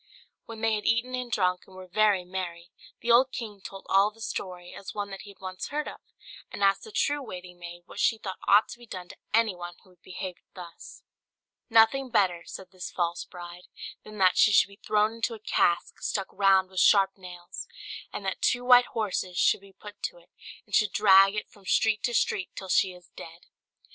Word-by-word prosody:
When 225 -1 -9
they 225 -1 +2
had 210 -1 -2
eaten 235 +3 +1
and 250 -1 -4
drunk, 180 -4 0
and 190 - -16
were 185 0 -9
very 195 0 +2
merry, 175 -1 -6 0.3
the 235 - +1
old 255 +3 +5
king 210 -5 -7
told 195 0 -10
all 195 +2 +4
the 220 +1 -22
story, 180 -5 -6
as 195 - -9
one 205 -1 -4
that 195 - -7
he 205 - -12
had 200 - -15
once 185 -1 -6
heard 300 +1 -3
of, - - -9 0.5
and 200 - -5
asked 195 0 +3
the 440 - -11
true 290 -7 0
waiting 180 -7 -9
maid 175 0 -9
what 200 - -11
she 225 - +3
thought 190 -4 -7
ought 205 +2 +6
to 240 - -9
be 240 - -14
done 180 -3 -8
to - - -12
anyone 185 -6 0
who 185 - -22
would 180 -1 -27
behave 185 -1 -7 0.2
thus. 175 -3 -11 0.7
"Nothing 230 +4 +4
better," 185 -7 +2
said 185 -1 -9
this 185 -1 -7
false 170 -1 -2
bride, 175 0 -10 0.4
"than 215 0 -11
that 185 -2 +4
she 215 - +6
should 200 - +5
be 200 - -16
thrown 215 +1 +2
into 230 0 -2
a - - -12
cask 175 -4 0
stuck 195 -2 -2
round 190 -1 +3
with 190 - -3
sharp 195 -1 +5
nails, 180 -2 -9 0.4
and 200 - -6
that 190 - -3
two 245 0 +1
white 245 0 +7
horses 185 -4 -2
should - - +3
be 195 0 -16
put 205 +2 -13
to - - -4
it, - - -22 0.3
and - - -20
should 215 -3 +3
drag 195 -1 +6
it 210 - -3
from 200 - -21
street 215 +1 +2
to 240 +1 -1
street 185 -4 0
till 190 - -8
she 185 +1 +3
is 180 -1 -17
dead." 165 +1 -12
195 Hz, 215 wpm, -27 LUFS, 180-220 Hz, 0.7 s, white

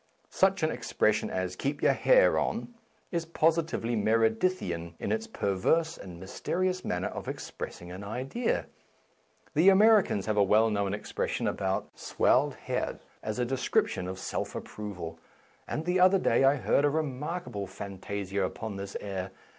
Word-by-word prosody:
Such 190 -2 +2
an 155 - +2
expression - - +1
as 95 0 -2
Keep 140 +8 -3
your - - +5
hair - - +5
on 240 +1 -2 0.2
" - - -39
is 170 -2 0
posi 165 0 +2
tively 120 -7 -3
Meredithian 110 - +1
in - - -3
its 220 +1 -1
perverse 160 - +1
and 90 -3 -10
mys 95 +2 -9
terious 185 0 0
manner 90 +1 -1
of - - -7
expressing 85 0 -6
an 95 +2 -7
idea. 130 - -2 0.9
The 165 +6 +6
Americans 200 - +5
have 110 -1 -1
a 100 - +6
well 110 +3 +4
known 100 -1 0
expression - - -2
about 95 0 -1
" - - -37
swelled - - +3
head - - -3
" - - -34
as 110 +1 -4
a 125 - +1
description 120 -7 0
of 95 0 -5
self - - -4
approval, 90 -6 -6 0.5
and 155 - -3
the 180 +1 +1
other 185 +2 +6
day 135 -7 +3
I 135 +2 +5
heard 140 +1 +2
a 145 - +4
remarkable 150 - -3
fantasia 100 +1 -4
upon 100 +2 -4
this 100 0 -5
air. 95 -2 -4
115 Hz, 165 wpm, -29 LUFS, -, 0.9 s, The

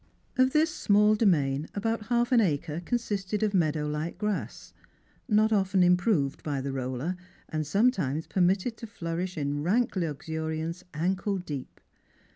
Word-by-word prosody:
Of 260 0 +4
this 310 +2 +2
small 210 +1 +4
domain 155 -9 +2
about 220 +1 -2
half 240 +1 +1
an 240 -2 +6
acre 155 -3 -1
consisted 210 -1 -2
of 210 -1 +1
meadow 155 -4 +1
like 150 +3 -3
grass, 210 -2 -4 0.6
not 215 +1 +4
often 190 -2 +3
improved 180 -5 +2
by 145 -3 -2
the 135 0 -3
roller, 130 +6 -2 0.3
and 155 -1 -2
sometimes 180 - +1
permitted 190 +5 +1
to 230 - -8
flourish 175 -2 -4
in 145 0 -1
rank 215 +10 +1
luxuriance 160 +1 -3
ankle 190 +5 0
deep. 145 -7 -7
180 Hz, 140 wpm, -28 LUFS, 155-210 Hz, 0.6 s, an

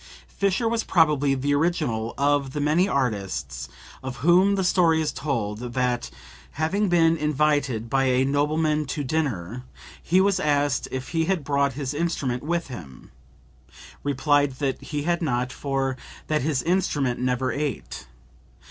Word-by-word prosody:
[Fischer 200 +4 0
was 230 0 0
probably 150 -5 +3
the 140 +2 0
original 145 -8 0
of 140 -1 +1
the 150 - -2
many 155 +6 +2
artists 95 - -2 0.3
of 130 -1 -5
whom 185 +4 +5
the 190 - 0
story 170 -3 +3
is 155 - 0
told 110 -8 -3
that, 125 - -1 0.4
having 190 +7 0
been 165 -2 +4
invited 145 -6 0
by 135 +3 +1
a 130 0 +3
nobleman 150 +2 +1
to 145 +2 -3
dinner, 125 - -2 0.4
he 180 +3 +2
was 195 -1 +3
asked 145 -3 +1
if 130 0 -5
he 165 -1 0
had 185 -3 0
brought 140 -1 +1
his 135 0 -4
instrument 145 -6 -1
with 170 +2 -1
him, 80 - -10 0.9
replied 145 0 +2
that 135 0 -2
he 145 -1 -4
had 175 +2 0
not, 125 -5 -1
for 135 -2 -1 0.3
that 155 -1 0
his 140 -2 0
instrument 155 -8 0
never 125 0 0
ate. 140 - -4
145 Hz, 150 wpm, -24 LUFS, 130-160 Hz, 0.9 s, whom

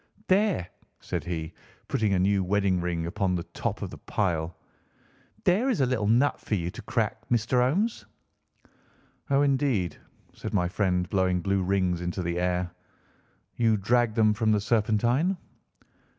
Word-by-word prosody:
"There," 190 - +2 0.3
said - - -4
he, 80 -2 -4 0.3
putting 110 -6 0
a - - +2
new 95 +1 +2
wedding 95 -1 +1
ring 85 -1 -2
upon 95 +1 0
the 85 - -2
top - - -4
of - - -5
the - - -10
pile. 85 -5 -1 0.9
"There 210 +9 +3
is 245 - +1
a - - +4
little 120 -5 0
nut 125 +6 +3
for 105 - -1
you 85 -2 -2
to - - -9
crack, - - -2
Master 120 +1 +2
Holmes." 190 - 0 1.2
"Oh, 140 +1 +4
indeed!" 135 -10 +1 0.4
said - - -5
my 90 -3 +2
friend, 90 -1 0
blowing 95 -2 +1
blue 100 +1 +1
rings 90 -2 0
into 90 +1 -3
the 85 0 -1
air. 90 0 0 0.9
"You 115 -2 +3
dragged 115 +2 +2
them 110 -1 +4
from 110 0 +1
the 105 - +3
Serpentine?" 120 - +1
100 Hz, 155 wpm, -27 LUFS, 90-120 Hz, 1.2 s, a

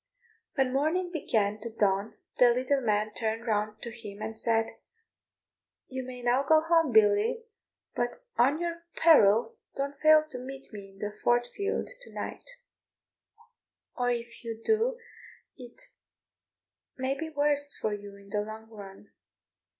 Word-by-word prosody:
When 265 -3 +1
morning 330 +6 0
began 215 -9 0
to 230 - -6
dawn 205 -2 0 0.2
the 245 - +7
little 260 +3 +1
man 215 -2 0
turned 225 +1 -2
round 215 -1 -1
to 235 - -5
him 210 -3 -10
and 220 +1 -5
said, 225 0 0 1.1
"You 260 0 -4
may 250 -1 -9
now 245 +2 +3
go 315 +3 +5
home, 325 -2 +2
Billy, 215 - +4 0.5
but 245 - -3
on 275 +6 +3
your 340 -1 -3
peril 270 - +5 0.2
don't 280 0 -3
fail 310 0 +6
to 250 - -5
meet 265 0 -9
me 200 -2 -9
in 195 - -19
the 205 +1 -4
Fort 240 0 +3
field 405 0 -1
to - - -10
night; - - -6 1.5
or 245 0 0
if 235 0 -4
you 225 -1 -5
do 460 +2 +2 0.6
it 245 -3 -13 1.2
may 260 +1 0
be 320 +3 -5
the 310 - -20
worse 290 0 +4
for 215 - -1
you 205 -1 -8
in 200 0 -16
the 205 0 0
long 220 +1 -8
run. 200 -1 -12
240 Hz, 150 wpm, -29 LUFS, 215-285 Hz, 1.5 s, the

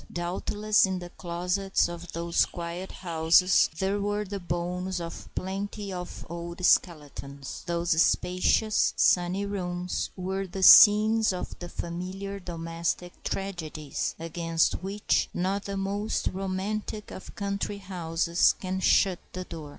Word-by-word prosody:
Doubtless 205 +4 +1
in 190 -1 -2
the 175 -1 -8
closets 180 +3 -1
of 175 0 -8
those 170 0 +1
quiet 175 +2 -6
houses 170 +1 +3
there 195 +2 0
were 205 +1 -1
the 200 0 -5
bones 180 +1 -3
of 165 -1 -7
plenty 195 +1 -4
of 180 -1 -7
old 170 +1 -5
skeletons. 140 -6 0
Those 170 -1 +2
spacious, 185 +5 +2
sunny 180 +3 +3
rooms 180 -3 -3
were 190 +1 -3
the 190 +1 -5
scenes 215 +2 +8
of 180 - -5
the 175 - -7
familiar 185 +4 -5
domestic 170 0 -4
tragedies 160 -6 -4
against 165 0 0
which 195 +2 0
not 190 +3 -1
the 200 -1 -4
most 200 +2 -1
romantic 195 +3 -3
of 185 - -10
country 200 0 -3
houses 170 -3 +1
can 185 0 -3
shut 190 -1 +3
the 185 - -4
door. 160 -4 -8
180 Hz, 125 wpm, -27 LUFS, 170-195 Hz, -, scenes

